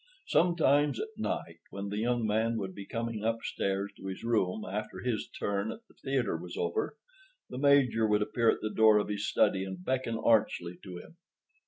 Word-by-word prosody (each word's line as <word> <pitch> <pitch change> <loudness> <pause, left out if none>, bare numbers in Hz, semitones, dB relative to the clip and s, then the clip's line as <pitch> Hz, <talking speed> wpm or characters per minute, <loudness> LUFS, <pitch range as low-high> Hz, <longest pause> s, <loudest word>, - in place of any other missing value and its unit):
Sometimes, 150 -5 +3
at 220 - -3
night, 85 - -3
when 100 0 -5
the 105 +1 -2
young 120 0 +1
man 110 +2 +1
would 95 -3 -4
be 100 +1 -9
coming 115 -2 -3
upstairs 100 -3 -1
to - - -8
his 95 +2 -6
room 110 -3 0
after 105 +2 -5
his 120 -3 -2
turn 100 +1 -2
at 225 - -9
the - - -22
theater 135 -8 -1
was 85 +1 -7
over, 85 - -1 0.5
the 125 - -5
Major 135 -6 +4
would 105 0 +3
appear 115 +2 +2
at - - +1
the 110 - -3
door 110 -1 +6
of 105 - 0
his 105 0 -2
study 95 -1 +2
and 95 -1 -7
beckon 130 -3 -1
archly 100 -6 +1
to 90 -3 -8
him. 165 - -13
110 Hz, 190 wpm, -30 LUFS, 100-120 Hz, 0.5 s, door